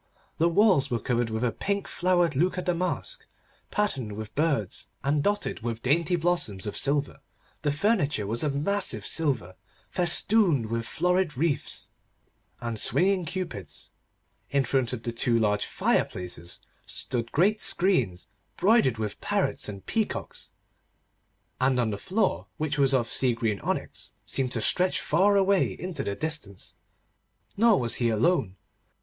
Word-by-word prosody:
The 165 Hz, +2 st, +4 dB
walls 170 Hz, -6 st, +4 dB
were 120 Hz, -, 0 dB
covered 120 Hz, +1 st, -1 dB
with 110 Hz, +2 st, -2 dB
a 120 Hz, -, +1 dB
pink 200 Hz, -, -2 dB
flowered 175 Hz, -3 st, +1 dB
Lucca 180 Hz, +5 st, +1 dB
damask, 180 Hz, 0 st, -2 dB, 0.4 s
patterned 135 Hz, -, -1 dB
with 110 Hz, 0 st, -7 dB
birds 145 Hz, -, -1 dB
and 145 Hz, +1 st, +1 dB
dotted 205 Hz, +5 st, -1 dB
with 115 Hz, 0 st, -5 dB
dainty 165 Hz, +6 st, +2 dB
blossoms 160 Hz, -, -1 dB
of 105 Hz, -, -4 dB
silver; 140 Hz, 0 st, 0 dB, 0.4 s
the 150 Hz, -, +1 dB
furniture 150 Hz, -, +1 dB
was 115 Hz, +6 st, -2 dB
of 145 Hz, -2 st, -1 dB
massive 195 Hz, +7 st, 0 dB
silver, 130 Hz, -, 0 dB, 0.4 s
festooned 175 Hz, -, +3 dB
with 115 Hz, 0 st, -2 dB
florid 180 Hz, -3 st, 0 dB
wreaths, 155 Hz, 0 st, -1 dB, 0.7 s
and 115 Hz, -2 st, -4 dB
swinging 185 Hz, -, +2 dB
Cupids; 160 Hz, -, -6 dB, 0.6 s
in 140 Hz, -1 st, +2 dB
front 130 Hz, -1 st, 0 dB
of 120 Hz, -3 st, -5 dB
the 120 Hz, -, -2 dB
two 115 Hz, 0 st, +1 dB
large 105 Hz, -2 st, +1 dB
fire -, -, +1 dB
places 85 Hz, -1 st, -6 dB, 0.3 s
stood 120 Hz, -3 st, -3 dB
great 205 Hz, +7 st, +2 dB
screens 130 Hz, -, +3 dB, 0.3 s
broidered 195 Hz, -, +3 dB
with 105 Hz, -2 st, -4 dB
parrots -, -, -1 dB
and 100 Hz, -2 st, -9 dB
peacocks, 220 Hz, -2 st, -3 dB, 1.1 s
and 130 Hz, 0 st, +2 dB, 0.2 s
the -, -, -3 dB
floor, 180 Hz, -, -1 dB
which 150 Hz, -1 st, -2 dB
was 135 Hz, -1 st, +4 dB
of 120 Hz, -3 st, +1 dB
sea 125 Hz, -1 st, +3 dB
green 110 Hz, -4 st, -1 dB
onyx, -, -, -4 dB
seemed 130 Hz, -2 st, -1 dB
to 115 Hz, -, -1 dB
stretch 180 Hz, -, +2 dB
far 195 Hz, +6 st, +3 dB
away 195 Hz, -1 st, +3 dB
into 180 Hz, -2 st, -4 dB
the 100 Hz, -, -3 dB
distance. 150 Hz, -, -4 dB, 0.8 s
Nor 225 Hz, -1 st, +4 dB
was 120 Hz, -2 st, 0 dB
he 120 Hz, -, +3 dB
alone. 110 Hz, -, +1 dB
140 Hz, 145 wpm, -27 LUFS, 115-180 Hz, 1.1 s, The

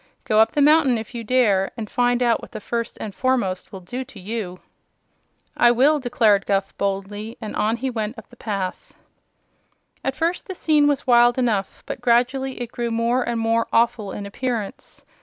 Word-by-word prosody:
"Go 215 Hz, -, +2 dB
up 220 Hz, -, +4 dB
the 290 Hz, -, +3 dB
mountain, 295 Hz, -4 st, +5 dB
if 220 Hz, +2 st, -7 dB
you 235 Hz, -1 st, -5 dB
dare, 210 Hz, -5 st, +2 dB
and 220 Hz, -2 st, -4 dB
find 245 Hz, +2 st, +1 dB
out 235 Hz, -2 st, +2 dB
what -, -, -12 dB
the 215 Hz, -, -5 dB
First 230 Hz, +2 st, -4 dB
and 210 Hz, -, -5 dB
Foremost 240 Hz, -8 st, -1 dB
will 190 Hz, -, -8 dB
do 245 Hz, +9 st, -5 dB
to 235 Hz, -6 st, -13 dB
you!" 190 Hz, -2 st, -5 dB, 1.0 s
"I 240 Hz, -, +5 dB
will," 275 Hz, +6 st, +4 dB
declared 230 Hz, -6 st, +2 dB
Guph, 195 Hz, -1 st, 0 dB
boldly; 200 Hz, +3 st, -3 dB
and 215 Hz, -2 st, -6 dB
on 220 Hz, +2 st, +1 dB
he 260 Hz, +2 st, -2 dB
went 220 Hz, 0 st, -3 dB
up -, -, -12 dB
the -, -, -14 dB
path. 195 Hz, -5 st, -5 dB, 1.1 s
At 270 Hz, -, -1 dB
first 340 Hz, +2 st, -1 dB
the 375 Hz, -, -5 dB
scene 300 Hz, -4 st, +3 dB
was 290 Hz, -2 st, 0 dB
wild 240 Hz, -1 st, +5 dB
enough, 220 Hz, -6 st, -1 dB
but -, -, -6 dB
gradually 255 Hz, +3 st, +1 dB
it 240 Hz, -, -9 dB
grew 240 Hz, -1 st, -3 dB
more 230 Hz, +2 st, +1 dB
and 235 Hz, -1 st, -2 dB
more 225 Hz, 0 st, +1 dB
awful 230 Hz, -3 st, +1 dB
in 205 Hz, -, -6 dB
appearance. 220 Hz, 0 st, -5 dB
235 Hz, 190 wpm, -22 LUFS, 210-255 Hz, 1.1 s, mountain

